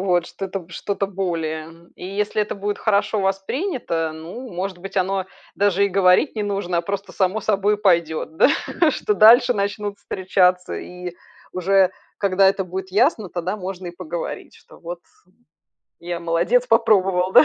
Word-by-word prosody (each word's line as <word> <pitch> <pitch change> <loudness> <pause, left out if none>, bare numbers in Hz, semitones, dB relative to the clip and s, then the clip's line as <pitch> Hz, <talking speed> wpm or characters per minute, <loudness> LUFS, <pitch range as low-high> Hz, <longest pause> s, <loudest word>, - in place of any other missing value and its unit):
Вот 180 -3 +1
что-то, 190 -2 -6
что-то 200 +3 -3
более. 165 -3 -4
И - - -8
если 205 +2 -1
это 210 - -4
будет 205 +1 -3
хорошо 210 0 +1
воспринято, 195 - -2
ну, 180 +11 -8
может 185 +1 -4
быть, 195 +2 -9
оно 190 0 0 0.3
даже 200 -1 +2
и - - +2
говорить 190 +6 +3
не 210 - -1
нужно, 195 -4 -1
а - - 0
просто 200 +2 -4
само 190 +3 0
собой 205 0 +1
пойдёт, 170 -5 +1
да, - - +6 0.4
что 420 - -1
дальше 245 - +7
начнут 205 0 -2
встречаться. 185 -1 +1
И 180 -1 -7 0.4
уже 190 +1 +3 0.3
когда 195 -1 +4
это 195 0 0
будет 190 +1 -6
ясно, 220 - +2
тогда 180 +3 -3
можно 185 -2 -6
и - - -5
поговорить, 170 -2 -6
что - - -18
вот, 170 +1 -7 1.0
я 175 0 -4
молодец 175 +9 +1
попробовал, 195 -5 +3
да. - - +8
190 Hz, 155 wpm, -22 LUFS, 175-205 Hz, 1.0 s, да